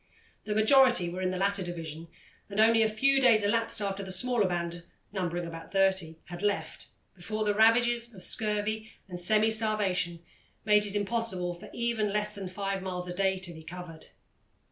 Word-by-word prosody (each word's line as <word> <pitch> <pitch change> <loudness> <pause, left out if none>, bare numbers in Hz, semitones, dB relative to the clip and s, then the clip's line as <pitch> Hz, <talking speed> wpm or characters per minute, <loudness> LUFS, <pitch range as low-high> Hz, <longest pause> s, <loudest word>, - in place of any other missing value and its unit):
The 210 - -2
majority 235 -4 +5
were 185 +1 -5
in 185 - 0
the 185 - -3
latter 200 +1 +1
division, 165 -2 -6 0.4
and 200 +1 -4
only 225 +1 +5
a 220 - +3
few 270 +5 +2
days 230 -5 +5
elapsed 230 +2 0
after 200 -1 -2
the 190 -1 -6
smaller 220 +2 +1
band, 170 -1 -3 0.3
numbering 175 -3 -3
about 165 -1 -9
thirty, 190 -4 +1
had 175 0 -8
left, 200 -6 -2 0.3
before 215 +4 -4
the 205 - +2
ravages 235 +2 +3
of 190 -5 -5
scurvy 215 0 -1 0.2
and 180 -2 -7
semi 215 +5 +2
starvation 195 -6 -1 0.4
made 210 -1 +4
it 200 - -6
impossible 205 -4 -1
for 175 - -12
even 235 -3 -1
less 210 0 0
than 195 -2 -6
five 195 +1 -3
miles 180 -1 -4
a 180 - -4
day 190 +1 +1
to 180 -2 -6
be 160 - -11
covered. 165 -1 -10
200 Hz, 180 wpm, -29 LUFS, 180-220 Hz, 0.4 s, majority